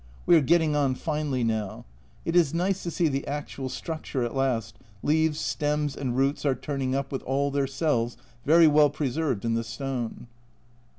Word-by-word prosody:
We 175 Hz, -, +6 dB
are 160 Hz, -, +6 dB
getting 160 Hz, +1 st, +3 dB
on 140 Hz, -3 st, +2 dB
finely 150 Hz, -4 st, -2 dB
now; 110 Hz, -3 st, -2 dB, 0.4 s
it 165 Hz, -, -1 dB
is 165 Hz, -3 st, +4 dB
nice 185 Hz, +2 st, 0 dB
to 175 Hz, -, -3 dB
see 170 Hz, 0 st, +1 dB
the 140 Hz, -2 st, -2 dB
actual 140 Hz, -2 st, -4 dB
structure 155 Hz, -3 st, -4 dB
at 120 Hz, -, -3 dB
last, 120 Hz, -5 st, 0 dB, 0.3 s
leaves, 155 Hz, 0 st, +2 dB
stems, 150 Hz, -1 st, -1 dB
and 125 Hz, -3 st, -3 dB
roots 135 Hz, +2 st, +1 dB
are 140 Hz, -3 st, +2 dB
turning 135 Hz, -1 st, -2 dB
up 135 Hz, 0 st, -2 dB
with 135 Hz, -, -3 dB
all 140 Hz, +2 st, 0 dB
their 140 Hz, -1 st, 0 dB
cells 130 Hz, -4 st, 0 dB, 0.3 s
very 165 Hz, +3 st, +6 dB
well 150 Hz, -1 st, +6 dB
preserved 140 Hz, -5 st, -2 dB
in 115 Hz, -, +1 dB
the 115 Hz, 0 st, 0 dB
stone. 125 Hz, 0 st, -4 dB
140 Hz, 180 wpm, -26 LUFS, 130-155 Hz, 0.4 s, We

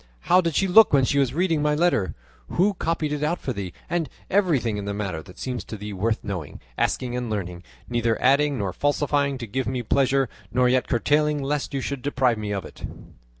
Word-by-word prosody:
How 180 Hz, -, +4 dB
did 165 Hz, -4 st, -2 dB
she 195 Hz, -, +2 dB
look 215 Hz, +4 st, +7 dB
when 135 Hz, -2 st, +4 dB
she 140 Hz, -, +1 dB
was 135 Hz, -1 st, +1 dB
reading 165 Hz, -3 st, +1 dB
my 150 Hz, 0 st, +2 dB
letter? 155 Hz, -, +1 dB, 0.4 s
Who 200 Hz, +4 st, +3 dB
copied 165 Hz, -4 st, -1 dB
it 150 Hz, -, -3 dB
out 155 Hz, +4 st, 0 dB
for 130 Hz, -, -3 dB
thee? 100 Hz, -4 st, -5 dB, 0.2 s
and 165 Hz, -5 st, -1 dB, 0.2 s
everything 150 Hz, -, +2 dB
in 100 Hz, -, -4 dB
the 100 Hz, 0 st, -3 dB
matter 95 Hz, -6 st, -3 dB
that 90 Hz, +2 st, -15 dB
seems 125 Hz, -2 st, -4 dB
to 110 Hz, -, -7 dB
thee 105 Hz, 0 st, -6 dB
worth 110 Hz, +4 st, -1 dB
knowing, 90 Hz, -8 st, -5 dB, 0.2 s
asking, 125 Hz, -, -1 dB
and 125 Hz, -2 st, -3 dB
learning; 90 Hz, -5 st, -4 dB, 0.3 s
neither 120 Hz, -2 st, 0 dB
adding 140 Hz, +2 st, +3 dB
nor 100 Hz, -5 st, -2 dB
falsifying 145 Hz, +2 st, +1 dB
to 120 Hz, -, -5 dB
give 130 Hz, +4 st, -3 dB
me 125 Hz, -1 st, -2 dB
pleasure, 135 Hz, +2 st, +2 dB, 0.2 s
nor 125 Hz, +2 st, +3 dB
yet 125 Hz, 0 st, +2 dB
curtailing 150 Hz, +4 st, +1 dB
lest 140 Hz, 0 st, -2 dB
you 135 Hz, -, -1 dB
should 140 Hz, 0 st, -4 dB
deprive 130 Hz, -5 st, +1 dB
me 105 Hz, -1 st, -3 dB
of 100 Hz, -4 st, -3 dB
it." -, -, -12 dB
130 Hz, 215 wpm, -24 LUFS, 110-150 Hz, 0.4 s, look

